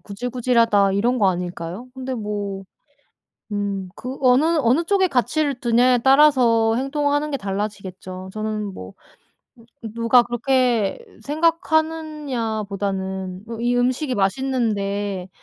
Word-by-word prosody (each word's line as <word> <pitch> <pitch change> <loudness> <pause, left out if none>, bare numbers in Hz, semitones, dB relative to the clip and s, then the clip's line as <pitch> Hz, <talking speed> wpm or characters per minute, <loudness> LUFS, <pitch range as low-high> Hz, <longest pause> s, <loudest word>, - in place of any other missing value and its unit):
'구질구질하다.' 230 -2 +1
이런 240 +6 +1
거 200 - +4
아닐까요? 180 +5 -5
근데 260 0 -5
뭐. 205 -3 -4 0.9
음. 200 -2 -2
그 255 +2 -7
어느, 255 +2 +4 0.2
어느 265 +5 +2
쪽에 380 +1 +2
가치를 280 -1 0
두냐에 245 +1 +3
따라서 250 -5 +4
행동하는 290 +3 0
게 275 - -1
달라지겠죠. 195 -2 -5
저는 215 -2 -3
뭐 95 0 -9 0.9
음 220 - -7
누가 230 +1 +4
그렇게 240 - 0 0.2
생각하느냐보다는 235 - -2
으 230 0 -6
이 240 +1 +1
음식이 255 +3 0
맛있는데 205 -4 -1
230 Hz, 270 characters per minute, -21 LUFS, 200-265 Hz, 0.9 s, 거